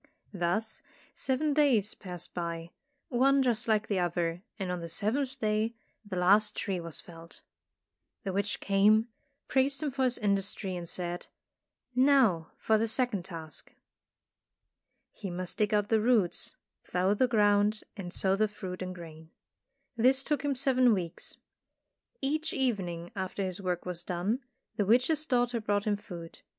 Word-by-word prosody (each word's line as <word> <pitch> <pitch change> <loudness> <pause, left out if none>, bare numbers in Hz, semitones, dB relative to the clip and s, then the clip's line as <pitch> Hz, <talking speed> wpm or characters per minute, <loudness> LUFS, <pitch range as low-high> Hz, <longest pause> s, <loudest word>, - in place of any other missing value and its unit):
Thus 190 +5 -1 0.3
seven 285 +3 0
days 255 -9 +3
passed 180 -2 -7
by, 170 -1 -4 0.4
one 270 +2 +4
just 240 -1 0
like 220 -1 +2
the 200 -3 0
other, 175 -1 -1 0.2
and 190 -3 -3
on 180 - -2
the 170 0 -6
seventh 255 - +1
day 220 0 0 0.3
the 205 -3 -6
last 195 +4 +4
tree 195 -4 -2
was 170 -2 -3
felled. 165 -1 -13 0.8
The 195 - -3
witch 200 +2 -1
came, 210 +3 +4 0.4
praised 275 +3 +1
him 295 - -1
for 265 0 -1
his 250 -1 +3
industry 200 -2 0
and 170 -1 -5
said, 175 -1 -4 0.7
"Now 250 - +4
for 220 -1 +2
the 225 - +1
second 225 -5 0
task." 165 -4 -8 1.4
He 200 - -7
must 180 +3 -3
dig 210 -1 +2
out 210 -1 +2
the 220 -1 +3
roots, 220 -6 +2 0.3
plough 185 +2 +1
the 255 +5 +3
ground 210 -2 +3
and 185 -4 -6
sow 190 +1 +2
the 215 +2 +2
fruit 185 -3 -7
and 185 0 -4
grain. 160 -2 -11 0.7
This 260 +3 +4
took 295 -1 -1
him 285 -1 0
seven 255 -3 +4
weeks. 175 -3 -4 0.8
Each 310 +3 0
evening 180 -10 -1
after 190 0 -3
his 185 0 -3
work 180 -2 -2
was 175 -1 -4
done, 185 +7 -1 0.4
the 205 - +2
witch's 265 +7 +3
daughter 245 -3 +1
brought 205 -1 0
him 210 -1 +2
food. 170 -5 -9
205 Hz, 155 wpm, -30 LUFS, 180-245 Hz, 1.4 s, one